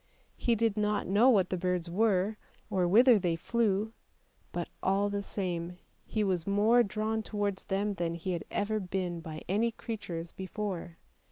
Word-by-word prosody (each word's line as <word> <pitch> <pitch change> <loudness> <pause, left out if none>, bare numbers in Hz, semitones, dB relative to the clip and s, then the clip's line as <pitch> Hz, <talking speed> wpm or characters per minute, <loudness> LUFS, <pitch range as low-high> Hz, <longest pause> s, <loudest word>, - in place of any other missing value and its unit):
He 235 - +1
did 225 -1 +1
not 210 0 +1
know 210 +7 +5
what 195 -7 +3
the 185 - 0
birds 180 -1 -1
were, 200 +2 +1 0.3
or 185 -3 +2
whither 235 +4 +6
they 175 -3 0
flew, 215 +3 0 0.6
but - - -3
all 200 +2 +1
the 200 0 -1
same 180 -3 -3 0.3
he 215 - 0
was 185 -4 0
more 210 +5 +4
drawn 220 +1 -1
towards 205 -3 -2
them 200 +2 0
than 170 -3 -2
he 175 +3 -3
had 175 - -2
ever 215 +1 -1
been 180 -2 -3
by 160 -1 -7
any 215 +5 +2
creatures 175 -8 -6
before. 190 -3 -5
200 Hz, 165 wpm, -30 LUFS, 180-215 Hz, 0.6 s, whither